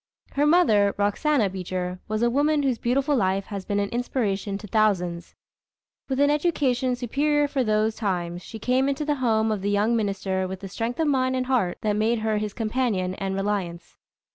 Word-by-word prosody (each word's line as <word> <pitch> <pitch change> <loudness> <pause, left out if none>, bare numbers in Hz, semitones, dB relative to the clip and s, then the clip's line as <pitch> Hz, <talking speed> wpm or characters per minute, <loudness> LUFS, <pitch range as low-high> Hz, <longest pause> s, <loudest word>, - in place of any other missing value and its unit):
Her 290 +1 +1
mother, 220 - +4
Roxana 210 +4 +2
Beecher, 185 -1 -4
was 215 +2 -1
a 240 - +4
woman 290 +3 +2
whose 260 -4 0
beautiful 275 +4 +1
life 195 -3 +1
has 200 -3 -6
been 205 0 -1
an 200 0 -1
inspiration 210 -5 -2
to 210 - -10
thousands. 180 -5 0 0.7
With 265 0 -1
an 285 0 +4
education 270 -5 +1
superior 290 +4 +1
for 275 -2 0
those 215 0 +1
times, 175 -5 -2
she 220 - -9
came 255 +4 +1
into 280 +2 -2
the 295 - +1
home 220 -2 +2
of 210 -3 -2
the 200 - -1
young 205 +3 +2
minister 195 -3 -1
with 190 +1 -7
a - - -4
strength 230 - -4
of 320 - +2
mind 260 -2 +1
and 255 0 -1
heart 245 -9 0
that 210 -1 +1
made 220 +3 +1
her 220 -1 0
his 210 -1 -4
companion 220 -5 -1
and 195 0 -3
reliance. 195 -4 -3
220 Hz, 190 wpm, -25 LUFS, 195-260 Hz, 0.7 s, mother